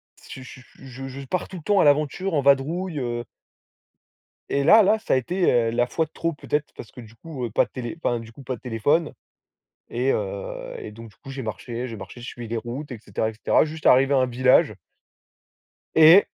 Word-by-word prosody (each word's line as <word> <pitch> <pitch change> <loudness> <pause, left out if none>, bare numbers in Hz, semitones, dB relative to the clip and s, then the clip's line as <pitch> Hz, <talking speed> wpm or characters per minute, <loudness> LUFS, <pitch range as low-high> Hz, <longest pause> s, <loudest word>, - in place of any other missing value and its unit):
C'est 130 - -11
je 130 - -11
suis 130 - -12 0.2
je 135 0 -9
je 135 +1 -8
je - - -9
pars 180 +4 -2
tout 185 - -9
le 160 - -10
temps 205 +1 +3
à - - +5
l'aventure 150 +6 +2
en 145 - +2
vadrouille 150 +5 +1
heu 120 -1 -3 1.2
Et 140 0 +1
là, 215 +8 +7
là, 215 +3 +3
ça - - -1
a - - +4
été, 180 +8 +1
heu, 115 -2 +2
la 120 +1 +1
fois 160 +4 0
de 155 - -22
trop 165 -1 -2
peut-être, 150 0 -3
parce 115 - -10
que 125 - -11
du 115 0 -14
coup, 140 -4 -6
heu, 115 - -6
pas - - +3
de - - -22
télé 125 +2 -6
enfin, 120 -1 +1
du 115 0 -11
coup 135 +4 -13
pas 130 0 -3
de - - -17
téléphone 140 +7 0 0.8
et 125 +3 0
heu, 100 -1 -4
et 105 - -8
donc 115 +1 -11
du 100 - -23
coup 135 - -13
j'ai 135 0 -5
marché, 120 +3 -5
j'ai 115 - -7
marché, 100 +5 -10
je 120 - -8
suivais 120 -1 -7
les 115 +1 -3
routes, 130 +5 -6
et 115 - -7
cetera, 110 0 -2
et - - -9
cetera, 115 - +2
juste, 155 0 -8
arrivé 135 +2 +5
à - - +4
un 130 - +3
village 130 +1 +3 1.2
et 160 +5 +8
130 Hz, 240 wpm, -24 LUFS, 120-155 Hz, 1.2 s, et